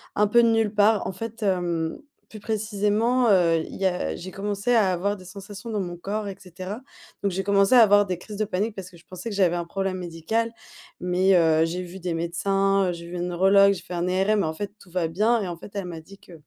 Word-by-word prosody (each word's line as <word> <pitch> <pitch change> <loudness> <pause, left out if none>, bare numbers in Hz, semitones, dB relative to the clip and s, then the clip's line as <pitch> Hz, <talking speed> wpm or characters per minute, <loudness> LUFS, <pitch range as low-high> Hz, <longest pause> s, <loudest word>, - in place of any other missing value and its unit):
un 210 0 +3
peu 235 +3 +5
de 230 - +4
nulle 225 -2 +1
part. 210 0 +3
En - - -2
fait, 225 +3 -7
hem, 175 -4 -1 0.3
plus 215 - -10
précisément, 220 +3 +1
heu, 170 -4 +4
il - - -9
y 195 - -1
a 130 - 0
j'ai 185 - -8
commencé 205 +4 -1
à 210 -5 +4
avoir 195 +3 -1
des 185 - -14
sensations 200 +4 -9
dans 210 - -1
mon 175 -2 -4
corps 205 +3 -4
et 195 - -5
cetera. 185 +4 -8 0.4
Donc 200 - +1
j'ai 190 +2 -2
commencé 200 +3 +3
à - - +9
avoir 205 -2 +6
des 185 -2 -3
crises 205 +4 -9
de 215 - 0
panique 205 +4 -2
parce 185 -2 -7
que 175 - -16
je 165 - -21
pensais 185 +4 -7
que 210 - -5
j'avais 180 -3 +3
un 170 -1 -3
problème 195 +2 -3
médical. 180 +7 -2 0.5
Mais, 180 +2 +2
heu, 160 -2 +4
j'ai 175 +2 -3
vu 180 +2 -9
des 180 -1 -3
médecins, 195 +3 +1
j'ai 170 0 -8
vu 175 - -7
une 175 0 -2
neurologue, 195 +3 +5
j'ai 175 - -7
fait 180 -1 -9
un 175 +1 -1
ERM 195 +3 +2
et - - 0
en 160 - -2
fait, 205 +4 -5
tout 180 - -17
va 175 -2 0
bien 215 +7 +2
et 195 - -3
en 175 -1 -5
fait, 200 - -12
elle 195 - -3
m'a 170 -2 -7
dit 195 +5 -15
que, 180 - -17
195 Hz, 255 wpm, -24 LUFS, 175-205 Hz, 0.5 s, à